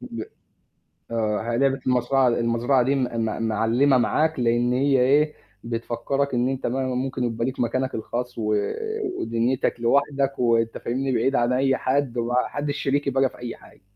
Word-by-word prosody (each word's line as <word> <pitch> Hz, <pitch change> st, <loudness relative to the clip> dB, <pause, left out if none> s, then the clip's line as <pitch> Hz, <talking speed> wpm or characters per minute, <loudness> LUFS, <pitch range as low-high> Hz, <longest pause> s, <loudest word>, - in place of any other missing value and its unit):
ب -, -, -6 dB, 0.9 s
آه، 110 Hz, 0 st, -1 dB
هي 115 Hz, -, 0 dB
لعبة 135 Hz, 0 st, +2 dB
المزرعة 125 Hz, +1 st, +2 dB
المزرعة 120 Hz, +2 st, +2 dB
دي 135 Hz, +3 st, +1 dB
م 135 Hz, -, +1 dB
م 115 Hz, -2 st, -2 dB
مِعلمَة 115 Hz, +5 st, +3 dB
معاك، 155 Hz, +4 st, +1 dB
لإن 120 Hz, +1 st, +2 dB
هي 135 Hz, +1 st, +2 dB
إيه؟ 145 Hz, +4 st, +3 dB, 0.3 s
بتفكرك 120 Hz, +4 st, -2 dB
إن 125 Hz, +1 st, +1 dB
أنت 135 Hz, -1 st, -2 dB
ما 130 Hz, +2 st, -1 dB
ممكن 130 Hz, 0 st, -2 dB
يبقى 115 Hz, -1 st, -1 dB
ليك 130 Hz, +1 st, -4 dB
مكانك 130 Hz, +2 st, -1 dB
الخاص، 120 Hz, +2 st, -4 dB
و 105 Hz, -1 st, 0 dB, 0.7 s
ودنيتك 115 Hz, +2 st, 0 dB
لوحدك، 140 Hz, +3 st, +1 dB
وأنت 115 Hz, -2 st, +2 dB
فاهمني؟ 130 Hz, +3 st, -2 dB
بعيد 130 Hz, +3 st, +1 dB
عن 120 Hz, +1 st, +2 dB
أي 135 Hz, +1 st, +2 dB
حد، 130 Hz, -2 st, 0 dB
وما 120 Hz, +1 st, -1 dB
حدش 145 Hz, 0 st, -3 dB
شريكي 145 Hz, 0 st, 0 dB
بقى 135 Hz, 0 st, +2 dB
في -, -, -17 dB
أي 120 Hz, -1 st, -6 dB
حاجة. -, -, -19 dB
125 Hz, 170 wpm, -24 LUFS, 115-135 Hz, 0.9 s, مِعلمَة